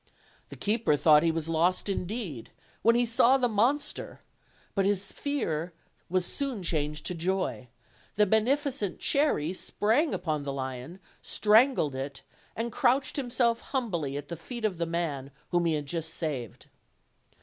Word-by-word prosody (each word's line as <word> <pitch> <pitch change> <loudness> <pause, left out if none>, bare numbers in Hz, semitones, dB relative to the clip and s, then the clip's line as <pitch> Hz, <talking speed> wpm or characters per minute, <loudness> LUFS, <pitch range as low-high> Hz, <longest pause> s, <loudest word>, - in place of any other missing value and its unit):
The - - -9
keeper 210 -7 +1
thought 150 +1 +6
he 165 0 +2
was 160 -1 -3
lost 165 +4 +2
indeed, 190 - -3 0.3
when 230 +1 +5
he 240 0 +3
saw 235 +3 +4
the 250 -2 +2
monster, 240 +7 0 0.5
but 195 - +1
his 200 0 +1
fear 180 - -2 0.4
was 185 0 +1
soon 265 -6 -2
changed 150 -2 -2
to 180 - -1
joy; 180 -6 -2 0.5
the 210 - +4
beneficent 225 - +1
Cherry 275 - +2
sprang 225 - +1
upon 155 -3 -1
the 140 -1 -4
lion, 130 +5 -5 0.2
strangled 215 - +4
it, 135 +1 -5 0.3
and 230 +1 -2
crouched 260 +4 +2
himself 240 -3 +1
humbly 170 - -2
at 145 0 -6
the 170 - -5
feet 235 +7 -5
of 190 -5 -1
the 170 - 0
man 160 -5 -2 0.2
whom 175 -1 +2
he 165 - +2
had 150 -1 -2
just 160 +2 -3
saved. 140 - -4
185 Hz, 150 wpm, -28 LUFS, 155-235 Hz, 0.5 s, thought